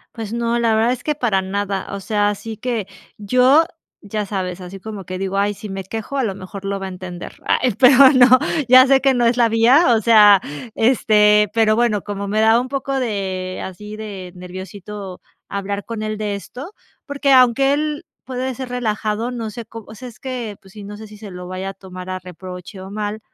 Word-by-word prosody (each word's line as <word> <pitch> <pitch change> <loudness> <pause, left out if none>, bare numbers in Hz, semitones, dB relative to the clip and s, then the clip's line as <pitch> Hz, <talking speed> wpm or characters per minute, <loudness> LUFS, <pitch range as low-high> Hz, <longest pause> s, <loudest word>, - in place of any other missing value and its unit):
Pues, 220 -3 -6
no, 235 0 0
la 230 -2 +2
verdad 225 +2 +2
es 250 - -8
que 300 - -1
para 225 -9 +1
nada. 195 0 -3
O - - -5
sea, 205 +1 0
así 220 +2 -5
que 225 -3 -3 0.3
yo, 255 +9 +4 0.4
ya 210 0 -4
sabes, 185 -2 -4
así 180 +2 -9
como 205 -1 -8
que 185 +1 -5
digo: 195 +1 -3
''Ay, 205 +1 +1
si 210 - -9
me 195 0 -5
quejo, 225 +7 -5
a 270 - +1
lo 200 -5 -2
mejor 195 +1 -9
lo 195 0 -2
va 195 - -5
a - - -5
entender''. 180 -1 -8
Ay, 250 -3 +2
pero 260 0 +7 0.2
no, 250 -2 +7 0.4
ya 255 +1 +9
sé 270 0 +4
que 270 -1 +3
no 240 -1 +2
es 235 +1 +2
la 235 -2 +4
vía, 240 +4 +5
o - - -2
sea, 210 -3 +7 0.4
este, 210 -3 +4
pero 220 -1 +4
bueno, 225 -4 +1
como 200 -1 -5
me 215 +2 +1
da 225 +1 +5
un 250 - -5
poco 275 0 -2
de 190 -6 -3
así 210 +3 -8
de 200 -4 -8
nerviosito 185 +1 -8 0.3
hablar 200 0 -4
con 225 0 -5
él 215 0 -4
de 210 -1 -2
esto, 260 - -9 0.3
porque, 285 -1 0
aunque 260 +2 +5
él 300 0 -2 0.2
puede 260 0 -4
ser 255 +1 -7
relajado, 225 -1 -2
no 230 -3 -4
sé 230 +2 -8
có 225 +1 -10
o 220 - -11
sea, 250 +4 -9
es 230 - -17
que, 245 -5 -5
pues 190 -1 -18
sí, 210 - -10
no 205 +1 -8
sé 215 +1 -10
si 210 0 -13
se 205 -2 -10
lo 180 0 -8
vaya 185 +1 -5
a - - -7
tomar 185 -1 -10
a 185 - -3
reproche 180 +1 -10
o 190 +1 -9
mal. 210 +1 -4
210 Hz, 220 wpm, -20 LUFS, 195-240 Hz, 0.4 s, ya